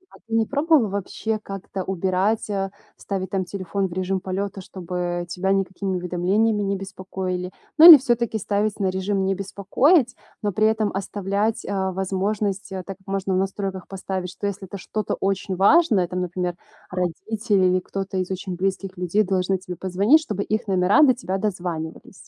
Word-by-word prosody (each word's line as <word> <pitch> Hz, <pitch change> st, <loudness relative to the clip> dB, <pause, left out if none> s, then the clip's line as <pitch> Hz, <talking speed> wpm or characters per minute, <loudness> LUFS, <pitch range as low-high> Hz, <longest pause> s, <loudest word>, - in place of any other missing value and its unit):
А -, -, -14 dB
ты 225 Hz, -, -2 dB
не 225 Hz, -1 st, +3 dB
пробовала 285 Hz, -3 st, +3 dB
вообще 200 Hz, +3 st, -3 dB
как-то 195 Hz, -1 st, -6 dB
убирать, 190 Hz, +4 st, 0 dB
а, 195 Hz, -1 st, -2 dB, 0.3 s
ставить 190 Hz, -2 st, -4 dB
там 190 Hz, -2 st, -1 dB
телефон 190 Hz, +1 st, -2 dB
в 175 Hz, -, -9 dB
режим 185 Hz, +1 st, -1 dB
полета, 195 Hz, +1 st, -3 dB
чтобы 175 Hz, -1 st, -4 dB
тебя 185 Hz, +2 st, -1 dB
никакими 195 Hz, 0 st, -1 dB
уведомлениями 190 Hz, +5 st, +1 dB
не 200 Hz, 0 st, -1 dB
беспокоили? 185 Hz, -1 st, -4 dB, 0.3 s
Ну 320 Hz, -, +10 dB
или 320 Hz, -, +14 dB
всё-таки 240 Hz, -4 st, 0 dB
ставить 205 Hz, +1 st, -1 dB
на 195 Hz, -2 st, +1 dB
режим 190 Hz, +1 st, -1 dB
"не 195 Hz, -, +1 dB
беспокоить", 240 Hz, -, +2 dB, 0.3 s
но 205 Hz, -, +1 dB
при 215 Hz, +3 st, +3 dB
этом 220 Hz, -1 st, +1 dB
оставлять, 200 Hz, +2 st, -1 dB
а, 190 Hz, -1 st, -1 dB
возможность, 195 Hz, +2 st, -2 dB
так 190 Hz, -2 st, -6 dB
как 195 Hz, -1 st, -7 dB
можно 195 Hz, 0 st, -1 dB
в -, -, +2 dB
настройках 195 Hz, -1 st, -3 dB
поставить, 190 Hz, -1 st, -4 dB
что 195 Hz, +2 st, -7 dB
если 195 Hz, -1 st, -5 dB
это 200 Hz, -, -7 dB
что-то 210 Hz, +2 st, -3 dB
очень 195 Hz, 0 st, -1 dB
важное, 200 Hz, -, +4 dB
там, 180 Hz, +1 st, -3 dB
например, 180 Hz, 0 st, -2 dB, 0.4 s
родители 190 Hz, +3 st, 0 dB
или 185 Hz, 0 st, +3 dB
кто-то 195 Hz, +1 st, -5 dB
из 185 Hz, -, -2 dB
очень 185 Hz, 0 st, -4 dB
близких 190 Hz, +1 st, -2 dB
людей 180 Hz, +4 st, +1 dB
должны 190 Hz, -1 st, 0 dB
тебе 180 Hz, -1 st, -8 dB
позвонить, 200 Hz, -, +3 dB
чтобы 205 Hz, -9 st, -3 dB
их 215 Hz, +1 st, -2 dB
номера 190 Hz, +7 st, +4 dB
до 260 Hz, -4 st, +5 dB
тебя 195 Hz, -6 st, -3 dB
дозванивались. 175 Hz, -5 st, -4 dB
195 Hz, 170 wpm, -23 LUFS, 185-205 Hz, 0.4 s, или